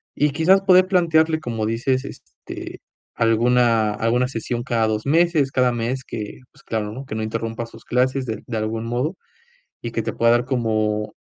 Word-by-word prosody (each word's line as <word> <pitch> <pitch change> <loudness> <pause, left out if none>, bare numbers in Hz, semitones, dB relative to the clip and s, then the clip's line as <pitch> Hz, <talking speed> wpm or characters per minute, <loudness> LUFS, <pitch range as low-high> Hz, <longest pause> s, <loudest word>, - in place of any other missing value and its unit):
Y 150 - +2
quizás, 170 +7 +4
poder 185 -1 +5
plantearle 160 -4 +3
como 115 -5 -3
dices, 130 +4 0
este, - - -10 0.4
alguna 115 -1 +3
alguna 125 +2 +2
sesión 120 -1 -3
cada 115 -3 +1
dos 110 0 -2
meses, 160 -2 +2
cada 125 -2 +2
mes 120 +3 -2
que 105 -2 -6
pues - - -22
claro 105 -2 -3
¿no? 130 +4 -7
Que 120 - -6
no 110 - -2
interrumpa 115 +1 -3
sus - - -15
clases 130 +2 +1
de 110 -3 -3
de 115 - -3
algún 110 +1 -2
modo 125 +9 -2 0.7
y 115 - -4
que 115 - -1
te - - -3
pueda 115 0 +3
dar 120 0 +2
como 110 -4 -1
120 Hz, 180 wpm, -22 LUFS, 115-135 Hz, 0.7 s, poder